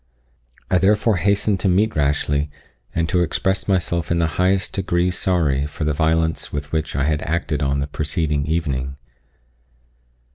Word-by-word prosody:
I 90 Hz, -, +4 dB
therefore 105 Hz, +2 st, +3 dB
hastened 100 Hz, +1 st, +1 dB
to 95 Hz, -, +1 dB
meet 105 Hz, +5 st, +2 dB
Rashleigh, 75 Hz, 0 st, +1 dB, 0.5 s
and 85 Hz, 0 st, +1 dB
to 90 Hz, 0 st, +1 dB
express 95 Hz, +3 st, 0 dB
myself 85 Hz, -4 st, 0 dB
in 85 Hz, -, +1 dB
the 85 Hz, -, +2 dB, 0.2 s
highest 95 Hz, 0 st, +1 dB
degree 90 Hz, -2 st, 0 dB
sorry 80 Hz, -7 st, +1 dB
for 75 Hz, -, -5 dB
the 75 Hz, 0 st, +1 dB
violence 80 Hz, +1 st, 0 dB
with 75 Hz, 0 st, -5 dB
which 75 Hz, -5 st, -2 dB
I 70 Hz, -, +1 dB
had 75 Hz, +1 st, 0 dB
acted 80 Hz, -2 st, -1 dB
on 70 Hz, 0 st, 0 dB
the -, -, -1 dB
preceding 75 Hz, -1 st, -1 dB
evening. 70 Hz, -5 st, -1 dB
80 Hz, 155 wpm, -21 LUFS, 75-90 Hz, 0.5 s, I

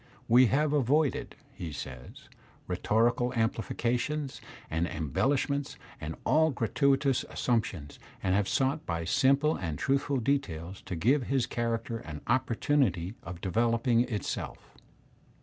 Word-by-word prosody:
"We 125 Hz, +2 st, +6 dB
have 150 Hz, +4 st, +2 dB
avoided/' 145 Hz, 0 st, +1 dB, 0.2 s
he 85 Hz, -10 st, -6 dB
says, 65 Hz, -3 st, -9 dB, 0.4 s
'^rhetorical 115 Hz, +6 st, +1 dB
amplifications 120 Hz, +5 st, -1 dB, 0.3 s
and 80 Hz, +2 st, -1 dB
em 80 Hz, -5 st, -4 dB
bellishments, 140 Hz, -, 0 dB, 0.2 s
and 80 Hz, +1 st, -5 dB
all 160 Hz, +1 st, +4 dB
gratuitous 135 Hz, +2 st, +1 dB
assumptions, 100 Hz, -12 st, -2 dB, 0.2 s
and 95 Hz, -1 st, +2 dB
have 100 Hz, 0 st, +1 dB
sought 135 Hz, +3 st, +1 dB
by 85 Hz, -1 st, -2 dB
simple 140 Hz, -, +3 dB
and 80 Hz, -5 st, -3 dB
truthful 140 Hz, -, +1 dB
details 100 Hz, -, -2 dB
to 90 Hz, -, -3 dB
give 125 Hz, -, +2 dB
his 135 Hz, -3 st, +1 dB
character 115 Hz, -1 st, -2 dB
an 80 Hz, -9 st, -8 dB
oppor 125 Hz, -2 st, +1 dB
tunity 100 Hz, -, +1 dB
of 85 Hz, 0 st, -8 dB
developing 115 Hz, +4 st, +2 dB
itself." 115 Hz, -5 st, -4 dB
120 Hz, 125 wpm, -29 LUFS, 90-135 Hz, 0.4 s, We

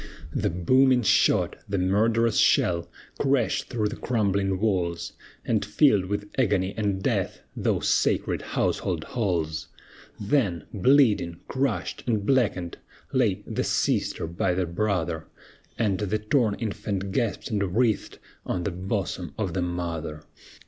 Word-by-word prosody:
The -, -, 0 dB
booming 130 Hz, +9 st, +3 dB
shot, -, -, +3 dB
the 100 Hz, -, 0 dB
murderous 110 Hz, +5 st, +2 dB
shell, 85 Hz, -2 st, +3 dB, 0.3 s
Crashed 135 Hz, -4 st, +1 dB
through 110 Hz, -4 st, 0 dB
the 115 Hz, -, -5 dB
crumbling 100 Hz, -6 st, 0 dB
walls, 90 Hz, -5 st, -1 dB, 0.3 s
And 110 Hz, -3 st, +1 dB
filled 105 Hz, -1 st, +3 dB
with 100 Hz, +2 st, -3 dB
agony 100 Hz, -5 st, +1 dB
and 100 Hz, -3 st, -1 dB
death -, -, -1 dB
Those -, -, 0 dB
sacred -, -, +1 dB
household -, -, -1 dB
halls! 85 Hz, -, -2 dB, 0.5 s
Then, 100 Hz, -, 0 dB
bleeding, 105 Hz, -6 st, +3 dB
crushed, 130 Hz, -4 st, -2 dB
and 110 Hz, -4 st, 0 dB
blackened, 105 Hz, -9 st, +1 dB, 0.3 s
lay -, -, +1 dB
The -, -, -2 dB
sister -, -, 0 dB
by 85 Hz, +2 st, -1 dB
the 90 Hz, 0 st, 0 dB
brother, 85 Hz, -3 st, -1 dB, 0.5 s
And 105 Hz, -5 st, +1 dB
the 105 Hz, 0 st, 0 dB
torn 105 Hz, 0 st, +1 dB
infant 100 Hz, -3 st, -3 dB
gasped 110 Hz, +3 st, -1 dB
and 100 Hz, -3 st, -1 dB
writhed 115 Hz, -4 st, +1 dB, 0.3 s
On 90 Hz, -, -2 dB
the 100 Hz, -, -1 dB
bosom 95 Hz, -1 st, -3 dB
of 95 Hz, -6 st, -2 dB
the 90 Hz, -, -1 dB
mother! 85 Hz, -3 st, -4 dB
100 Hz, 130 wpm, -26 LUFS, 90-110 Hz, 0.5 s, booming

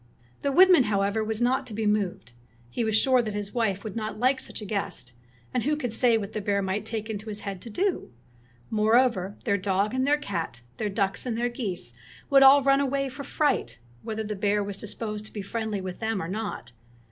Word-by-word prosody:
The 280 Hz, -, 0 dB
woodman, 360 Hz, -3 st, +7 dB
however, 200 Hz, +1 st, +1 dB
was 220 Hz, +2 st, -1 dB
not 255 Hz, +2 st, +1 dB
to 220 Hz, -, -7 dB
be 220 Hz, 0 st, -1 dB
moved. 195 Hz, -, -1 dB, 0.4 s
He 235 Hz, -, -1 dB
was 220 Hz, -1 st, +3 dB
sure 255 Hz, +2 st, +4 dB
that 215 Hz, -3 st, -4 dB
his 205 Hz, -1 st, -4 dB
wife 200 Hz, -5 st, 0 dB
would 215 Hz, -3 st, -6 dB
not 220 Hz, -1 st, -3 dB
like 260 Hz, +4 st, +2 dB
such -, -, -6 dB
a 210 Hz, -, -7 dB
guest, 195 Hz, -, -3 dB, 0.4 s
and 250 Hz, -, +1 dB
who 295 Hz, +6 st, +1 dB
could 245 Hz, -7 st, -3 dB
say 235 Hz, -1 st, +4 dB
what 205 Hz, -1 st, -5 dB
the 215 Hz, -, -2 dB
bear 200 Hz, 0 st, +1 dB
might 195 Hz, +3 st, -2 dB
take 220 Hz, -1 st, -3 dB
it -, -, -4 dB
into 215 Hz, +1 st, -6 dB
his 210 Hz, -1 st, -5 dB
head 195 Hz, -2 st, -5 dB
to 235 Hz, -, -8 dB
do? 370 Hz, -, -1 dB, 0.6 s
Moreover, 220 Hz, -2 st, +3 dB
their 200 Hz, 0 st, +2 dB
dog 195 Hz, +3 st, 0 dB
and 260 Hz, +1 st, +1 dB
their 295 Hz, +1 st, +4 dB
cat, 165 Hz, -, -4 dB, 0.2 s
their 210 Hz, -, -1 dB
ducks 195 Hz, +3 st, -1 dB
and 230 Hz, -2 st, -1 dB
their 240 Hz, +1 st, +1 dB
geese 190 Hz, -, -4 dB, 0.4 s
would 275 Hz, -1 st, +7 dB
all 270 Hz, +1 st, +8 dB
run 275 Hz, 0 st, +4 dB
away 275 Hz, 0 st, 0 dB
for 270 Hz, +2 st, -8 dB
fright, 280 Hz, -, 0 dB, 0.2 s
whether 220 Hz, 0 st, -4 dB
the 210 Hz, 0 st, -4 dB
bear 205 Hz, +1 st, +1 dB
was 200 Hz, -1 st, -5 dB
disposed 215 Hz, 0 st, -4 dB
to -, -, -15 dB
be 205 Hz, -, -5 dB
friendly 220 Hz, -1 st, -3 dB
with 185 Hz, -1 st, -6 dB
them 220 Hz, -2 st, -1 dB
or 165 Hz, -, -3 dB
not. 205 Hz, -, -4 dB
215 Hz, 225 wpm, -27 LUFS, 200-245 Hz, 0.6 s, all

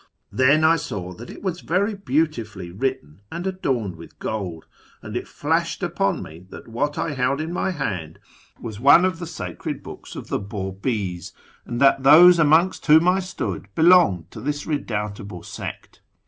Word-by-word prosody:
Then 140 Hz, +4 st, +4 dB
I 165 Hz, +1 st, +5 dB
saw 90 Hz, -, -5 dB
that 115 Hz, +7 st, -11 dB
it -, -, -11 dB
was 180 Hz, -3 st, -3 dB
very 200 Hz, +5 st, 0 dB
beautifully 125 Hz, -, -2 dB
written 95 Hz, -, -4 dB
and 170 Hz, +2 st, -5 dB
adorned 130 Hz, -, -2 dB
with 85 Hz, -, -13 dB
gold, 90 Hz, -7 st, -4 dB, 0.4 s
and -, -, -7 dB
it -, -, -3 dB
flashed -, -, -1 dB
upon -, -, 0 dB
me 85 Hz, +4 st, -12 dB
that -, -, -11 dB
what 135 Hz, +6 st, -2 dB
I 165 Hz, -, -1 dB
held 130 Hz, +1 st, 0 dB
in 160 Hz, +2 st, -4 dB
my 185 Hz, -, -1 dB
hand 95 Hz, -, -4 dB, 0.4 s
was 110 Hz, -3 st, -7 dB
one 145 Hz, +8 st, +7 dB
of 185 Hz, -3 st, -1 dB
the 170 Hz, -, -5 dB
sacred 90 Hz, -, -6 dB
books -, -, -10 dB
of -, -, -8 dB
the -, -, -1 dB
Babis, 100 Hz, -2 st, -4 dB, 0.3 s
and 120 Hz, 0 st, -4 dB
that 135 Hz, -1 st, +5 dB
those 170 Hz, +6 st, +8 dB
amongst 165 Hz, +5 st, +3 dB
whom 160 Hz, +3 st, +6 dB
I 185 Hz, +1 st, +4 dB
stood 180 Hz, -, -4 dB
belonged 160 Hz, -, +4 dB
to 110 Hz, -, -9 dB
this 145 Hz, +3 st, -3 dB
redoubtable 105 Hz, -, -4 dB
sect. -, -, -8 dB
130 Hz, 170 wpm, -23 LUFS, 100-165 Hz, 0.4 s, those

